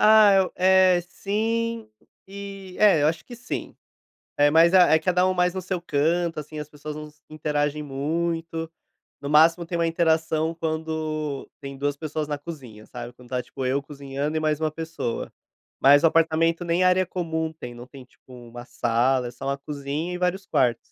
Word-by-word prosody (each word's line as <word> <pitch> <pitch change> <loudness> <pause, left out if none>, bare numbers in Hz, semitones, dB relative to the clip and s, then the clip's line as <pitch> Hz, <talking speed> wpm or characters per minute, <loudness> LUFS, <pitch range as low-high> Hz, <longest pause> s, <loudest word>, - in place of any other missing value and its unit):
Ah, 215 -1 +7
eu, 190 -1 +2
eh, 185 -1 +5
sim, 225 +3 -2 0.4
e, 195 -1 -9
é, 200 -8 +5
eu 150 - +4
acho 160 0 -3
que 245 - -10
sim. 245 +1 -6 0.6
É, 145 0 +4
mas 165 +3 +5
é 175 -4 +6
cada 180 +3 +2
um 185 - +2
mais 180 0 +1
no 190 - -2
seu 185 -1 -3
canto, 165 +1 0
assim, 150 +1 -9
as 150 0 -6
pessoas 150 0 -8
não 150 0 -8
se 150 - -30
interagem 150 -1 -1
muito, 165 +3 -3 0.5
no 140 - -5
máximo 165 +3 +5
tem 170 +1 -3
uma 170 0 +1
interação 160 -1 +1
quando 155 -2 -3
tem 140 -1 -7
2 145 +1 -1
pessoas 155 0 -4
na 145 -1 -2
cozinha, 130 -9 -10
sabe? 120 -1 -8
Quando 125 0 -17
tá 125 -1 -1
tipo 130 - -6
eu 135 +2 +1
cozinhando 140 +1 -5
e - - +1
mais 155 -1 0
uma 155 -1 0
pessoa. 160 -7 -4 0.5
Mas 145 +2 +6
o - - +7
apartamento 165 +1 +2
nem 170 +1 +1
área 185 0 +4
comum 160 -3 -3
tem, 125 -6 -9
não 120 +1 -11
tem 135 -2 -13
tipo 130 - -23
uma 120 0 -10
sala, 125 +2 +1
é 120 - -7
só 125 - -9
uma 140 0 -1
cozinha 145 +4 -4
e - - -3
vários 180 +2 -1
quartos. 120 -3 +2
160 Hz, 190 wpm, -24 LUFS, 140-175 Hz, 0.6 s, Ah